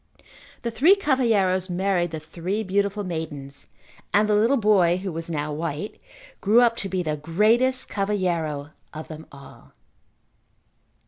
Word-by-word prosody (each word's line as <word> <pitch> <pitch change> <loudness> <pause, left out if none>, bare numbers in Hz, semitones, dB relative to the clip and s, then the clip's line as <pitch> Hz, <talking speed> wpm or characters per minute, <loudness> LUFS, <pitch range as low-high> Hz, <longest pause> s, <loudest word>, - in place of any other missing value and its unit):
The 235 - -2
three 300 - +5
cavalheiros 220 - +1
married 180 -1 0
the 160 -1 -5
three 180 +7 -4
beautiful 200 +1 0
maidens 150 -6 -6 0.4
and 210 +1 +3
the 210 - +2
little 225 +7 +3
boy 195 -6 +3
who 190 0 -4
was 165 +1 -5
now 150 -2 -2
white, 160 +4 -5 0.4
grew 220 +5 +5
up 235 -1 +4
to 195 - -3
be 185 -1 -1
the 155 -2 -2
greatest 220 - +2
cavalheiro 170 -8 -2 0.2
of 155 - -7
them 155 0 -9
all. 140 -1 -15
185 Hz, 140 wpm, -24 LUFS, 160-215 Hz, 0.4 s, three